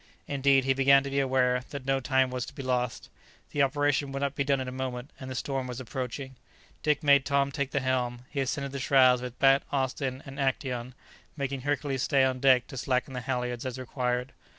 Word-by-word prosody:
Indeed, 140 -1 +3
he 135 +1 +2
began 135 +1 +5
to 140 - -5
be 140 - +1
aware 130 -2 +2
that 140 -2 -7
no 135 0 +1
time 130 0 +2
was 125 -1 -2
to - - -11
be 135 - -6
lost. 125 -2 -1 0.4
The 145 - +1
operation 145 0 +1
would 135 +1 -3
not 140 -1 0
be 140 - 0
done 140 -1 +1
in 130 - -4
a - - -4
moment, 130 0 -5
and 130 - -7
the 130 - -5
storm 135 0 -2
was 125 0 -5
approaching. 130 +2 -5 0.5
Dick 150 0 +1
made 140 -2 +6
Tom 140 0 +1
take 140 0 -2
the 140 - -1
helm; 125 -1 -1
he 140 - -5
ascended 140 +1 -2
the 140 - -4
shrouds 130 -1 +5
with 125 -1 -7
Bat, 135 0 +5
Austin, 130 -1 -2
and 135 0 -9
Actæon, 130 -2 -2 0.4
making 140 -1 -3
Hercules 140 -1 -1
stay 135 +1 +3
on 130 -1 +1
deck 130 -2 +5
to 135 - -8
slacken 130 +1 -1
the 125 - -4
halyards 125 -1 -2
as 130 -1 -4
required. 125 0 -2
130 Hz, 220 wpm, -28 LUFS, 125-140 Hz, 0.5 s, made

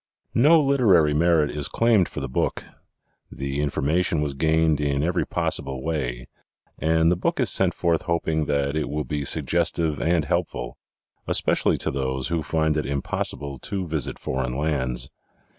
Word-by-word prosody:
No 150 +7 +6
literary 110 - +4
merit 80 -1 +3
is 75 -1 0
claimed 115 -6 +2
for - - -6
the 70 - -3
book. 65 - -1 0.7
The 70 +1 -3
information 75 +4 0
was 75 -2 -1
gained 80 +1 +2
in 70 -1 0
every 90 +2 0
possible 65 -1 -2
way 65 -6 -3 0.5
and 80 +1 +3
the - - +3
book 85 - -1
is - - +2
sent - - +2
forth 85 -2 +1
hoping 80 -2 -1
that 70 0 0
it 75 -2 -1
will 75 +1 -2
be 75 +3 -3
suggestive 85 -1 0
and 80 -1 +1
helpful, - - -3 0.5
especially - - +2
to - - -2
those 65 0 -2
who 85 -2 0
find 80 0 0
it 75 - -1
impossible 70 0 -3
to 95 +6 -3
visit 75 -5 -3
foreign 65 -1 -3
lands. 65 -5 -1
75 Hz, 160 wpm, -24 LUFS, 70-85 Hz, 0.7 s, No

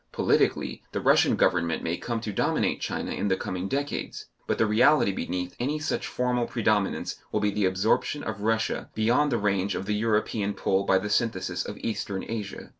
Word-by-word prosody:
Politically - - +1
the - - -1
Russian - - +4
Government 85 -2 +1
may 85 +1 -1
come 115 +5 -3
to 110 -3 -4
dominate - - 0
China - - -3
in 105 - -1
the 95 -1 +2
coming 90 +1 -3
decades, 140 +5 -3 0.2
but - - 0
the 115 - +3
reality 120 +2 +4
beneath 90 -1 -4
any 140 +5 0
such 155 +1 -2
formal 125 -1 0
predominance 110 -4 0
will - - +1
be 105 0 +1
the 105 -1 0
absorption 95 +9 +1
of 110 -2 -5
Russia 110 +1 0
beyond 125 +7 +2
the 120 - +2
range 100 -2 0
of 95 - -3
the 105 - -1
European 105 -1 0
pull 95 +1 +1
by 95 - +4
the 100 +2 -2
synthesis 95 -6 0
of 105 - -7
Eastern 100 -3 -3
Asia. 105 -4 -5
105 Hz, 190 wpm, -27 LUFS, 95-115 Hz, 0.2 s, Russian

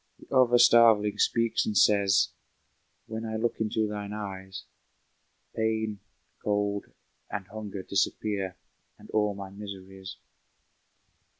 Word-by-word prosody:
The - - -7
other 125 -2 +5
starveling 110 -4 +5
speaks 115 -1 +2
and 105 - -1
says, 100 -1 +4 0.8
"When 110 0 -5
I 110 -1 -4
look 115 +2 -1
into 110 0 0
thine 105 -1 -5
eyes 95 -3 -6 0.9
Pain, 110 -2 -1 0.4
cold 105 -1 0 0.4
and 100 - -4
hunger 105 -3 -7
disappear, 100 -1 -1 0.4
And - - -15
all 105 -2 +1
my 95 -1 -8
miseries." 95 -2 -9
105 Hz, 110 wpm, -28 LUFS, 100-110 Hz, 0.9 s, other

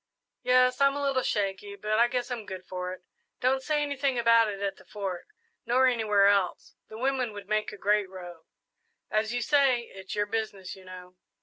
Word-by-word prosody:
"Yes; 255 +1 +3
I'm 275 0 +4
a 285 - -3
little 275 -2 +1
shaky, 200 -2 -2
but 215 +2 -1
I 235 - +6
guess 250 +1 -3
I'm 230 -4 -5
good 185 -1 -7
for 180 0 -4
it. 185 0 -9 0.4
Don't 265 +1 +2
say 295 +2 0
anything 280 -2 -1
about 230 -1 +5
it 200 -2 -4
at 195 -1 -2
the - - -16
Fort, 195 -4 -5 0.4
nor 250 +2 +3
anywhere 215 -5 +3
else 200 -3 +1
the 220 - -10
women 255 -2 0
would 205 -1 -9
make 215 0 0
a 210 - -9
great 205 -1 +1
row." 175 -3 -10 0.7
"As 215 +1 +1
you 245 0 -1
say 275 -4 +3
it's 190 0 -7
your 205 0 +1
business, 205 -3 -4
you 190 -1 -15
know." 180 0 -11
215 Hz, 200 wpm, -28 LUFS, 195-250 Hz, 0.7 s, I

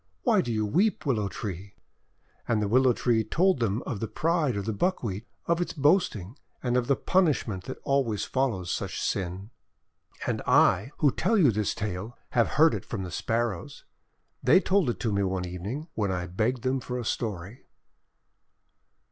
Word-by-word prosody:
Why - - +4
do 120 - -3
you 110 -1 0
weep, 190 - +1
Willow 110 -8 +1
Tree 100 0 -6 0.4
?': - - -38
And 115 -2 +2
the 105 - 0
Willow 130 +4 +4
Tree 115 -1 +1
told 185 - +2
them 115 0 0
of 110 - -4
the 115 - -2
pride 160 -5 0
of 100 - -3
the 110 - -1
Buckwheat, 110 - -2 0.2
of 170 +1 +1
its 175 - -2
boasting, 145 - +1 0.2
and 125 -1 0
of 125 -1 +1
the 140 - +3
punishment 135 - +1
that 130 - -6
always 130 -7 0
follows 115 -10 -1
such - - -3
sin. 95 +3 -3 0.7
And - - -1
I - - +4
who 145 - +3
tell 225 - +1
you 155 - +5
this 105 -1 -1
tale 105 +3 -4
have 115 -2 +3
heard 160 +1 +6
it - - -3
from 100 -5 -5
the 90 - -6
Sparrows. 115 -4 -2 0.6
They 145 +9 +6
told 190 -6 +2
it 120 - -3
to 110 -3 0
me 100 - +1
one 95 -2 -1
evening, 100 - -5
when 100 -3 -1
I 90 -1 -2
begged 110 +7 -1
them 130 +1 +1
for 125 -1 -5
a 120 - -4
story. 105 +2 -4
115 Hz, 180 wpm, -27 LUFS, 100-135 Hz, 0.7 s, heard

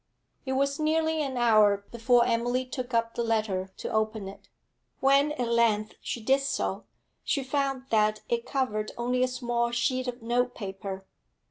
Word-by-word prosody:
It 265 - 0
was 275 +2 0
nearly 315 0 +1
an 270 -3 -3
hour 210 -4 +4
before 235 +1 +3
Emily 245 +2 0
took 250 -1 -5
up 230 -1 +1
the - - -2
letter 215 -5 0
to - - -5
open 220 -2 -1
it. 195 - -12 0.5
When 275 +2 +4
at 250 -5 -2
length 230 -2 +2
she 235 - -4
did 270 +4 +3
so, 275 - -2 0.4
she 275 - 0
found 270 -1 -1
that 215 -1 +2
it 235 0 -1
covered 215 -6 -1
only 250 +1 0
a 255 - +4
small 240 -2 -1
sheet 250 +2 0
of 245 -1 -5
notepaper. 205 -5 -2
240 Hz, 160 wpm, -28 LUFS, 220-260 Hz, 0.5 s, hour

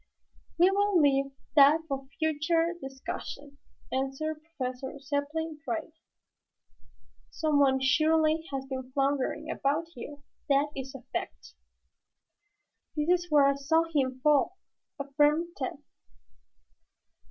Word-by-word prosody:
"We 360 +3 +5
will 405 -2 +3
leave 275 -2 +3 0.2
that 295 +2 +7
for 270 -2 -4
future 325 +2 +1
discussion," 270 +1 -7 0.3
answered 270 +4 -2
Professor 265 -4 -5
Zepplin 295 +3 -3
dryly. 235 -4 -4 1.4
"Someone 285 -4 +2
surely 310 +3 +3
has 270 -1 -4
been 260 -1 -6
floundering 280 +2 0
about 305 +4 -1
here, 285 +4 -8 0.3
that 280 +1 +3
is 265 0 -6
a 260 - -9
fact." - - -5 1.4
"This 300 +1 -1
is 350 0 +2
where 295 -2 +5
I 280 - +4
saw 310 +4 +2
him 260 -3 0
fall," 300 +5 +3 0.4
affirmed 295 +4 +2
Tad. 265 0 -3
285 Hz, 105 wpm, -29 LUFS, 270-315 Hz, 1.4 s, that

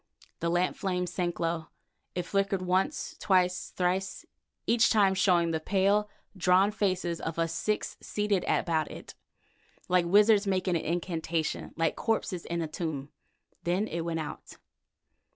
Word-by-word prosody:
The 170 - 0
lamp 175 +2 +1
flame 180 -2 -1
sank 175 -1 -2
low. 165 -1 -1 0.5
It 180 - -1
flickered, 195 0 0
once, 185 +1 0
twice, 185 -2 +2
thrice, 185 +1 -1 0.4
each 230 -1 +4
time 200 -3 +4
showing 175 -3 +3
the 160 - 0
pale, 200 +4 +2 0.3
drawn 190 +2 +4
faces 185 -5 -1
of 160 0 -4
us 165 0 0
six 210 +5 -2
seated 205 -3 0
about 160 -3 +1
it, - - -10 0.7
like 180 -1 +3
wizards 205 +2 +5
making 185 -2 +1
an 165 - 0
incantation, 165 -1 -2
like 165 -1 +1
corpses 200 -5 -1
in 170 0 -2
a - - -3
tomb. 155 -3 -4 0.5
Then 180 +5 0
it 170 -3 -3
went 165 0 -2
out. 155 - -7
180 Hz, 145 wpm, -29 LUFS, 170-195 Hz, 0.7 s, wizards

